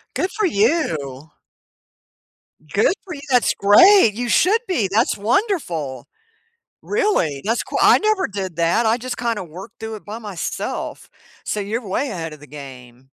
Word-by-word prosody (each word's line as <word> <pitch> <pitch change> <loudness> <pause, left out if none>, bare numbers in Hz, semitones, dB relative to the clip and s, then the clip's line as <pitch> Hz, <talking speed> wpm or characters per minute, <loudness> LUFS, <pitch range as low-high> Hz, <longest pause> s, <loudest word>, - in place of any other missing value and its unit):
Good 370 - -1
for 430 - 0
you. 160 - -1 1.4
Good 210 - +3
for 355 -4 -7
you, 280 - -9
that's 250 -2 +3
great, 225 - +6
you 240 +1 -3
should 415 - +3
be, 235 - 0
that's 220 +3 +2
wonderful. 200 - -1 0.8
Really, 410 - 0
that's 230 +3 0
qui - - -4
I - - +7
never 430 -2 +1
did 190 -4 -5
that, 170 +8 +2
I 225 +2 +3
just 255 +1 -6
kinda 230 -5 -2
worked 190 +8 -12
through 220 -1 -5
it - - -14
by 215 +2 -7
myself, 205 -6 -5 0.3
so 210 - -2
you're 215 +3 -4
way 270 +9 -1
ahead 165 -6 -5
of 150 - -12
the 145 - -13
game. 130 -3 -12
210 Hz, 160 wpm, -20 LUFS, 165-255 Hz, 1.4 s, I